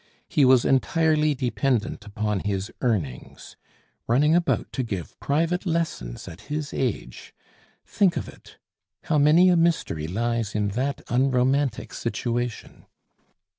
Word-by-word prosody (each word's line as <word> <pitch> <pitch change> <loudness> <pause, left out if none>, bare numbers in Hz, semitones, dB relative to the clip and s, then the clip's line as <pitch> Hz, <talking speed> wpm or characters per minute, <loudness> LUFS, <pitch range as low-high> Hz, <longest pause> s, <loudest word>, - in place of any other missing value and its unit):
He 145 - +3
was 130 -2 +5
entirely 155 +2 +2
dependent 125 -4 -1
upon 105 0 -2
his 100 0 -3
earnings. 90 - -3 0.5
Running 145 +7 +3
about 175 0 +1
to 130 - -1
give 100 - -5
private 165 +5 0
lessons 160 - -3
at 85 - -10
his 150 0 -3
age! 125 -5 -4 0.5
Think 190 -4 +2
of - - -3
it. - - -15 0.5
How 155 -2 +1
many 160 +6 +6
a 180 - +4
mystery 165 - +1
lies 115 +3 -2
in 105 -1 +1
that 130 +7 -2
unromantic 130 0 +1
situation! 120 -1 -4
130 Hz, 125 wpm, -25 LUFS, 105-150 Hz, 0.5 s, many